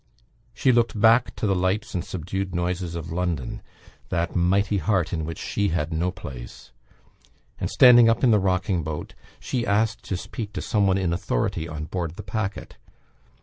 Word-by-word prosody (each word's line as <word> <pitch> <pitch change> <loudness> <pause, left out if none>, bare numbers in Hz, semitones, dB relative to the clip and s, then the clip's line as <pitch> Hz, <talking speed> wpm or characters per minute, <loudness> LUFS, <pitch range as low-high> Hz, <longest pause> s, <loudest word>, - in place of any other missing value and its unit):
She 130 - +3
looked 115 -3 +1
back 115 +3 +4
to - - -3
the 100 - +2
lights 95 +3 -1
and 90 - -2
subdued 95 +1 -4
noises 90 0 -2
of 80 -1 -6
London 85 -6 -2 0.5
that 85 -1 -1
"Mighty 95 +3 +2
Heart" 95 -5 0
in 80 -2 -2
which 80 0 -5
she 100 -1 -1
had 80 -2 -1
no 85 +3 0
place 70 -10 -9 0.9
and, - - -2
standing 120 -2 +7
up 115 +2 +1
in 125 - +5
the 105 - +5
rocking 95 -1 0
boat, 75 -1 -5 0.3
she 125 -2 -2
asked 110 0 +1
to 95 - -2
speak 105 +2 -6
to 95 - -4
some 105 -2 +2
one 95 0 +3
in 90 -3 0
authority 85 -3 -1
on 75 -2 -5
board 85 -1 -4
the 105 - -8
packet. 100 +1 -4
95 Hz, 180 wpm, -24 LUFS, 85-105 Hz, 0.9 s, standing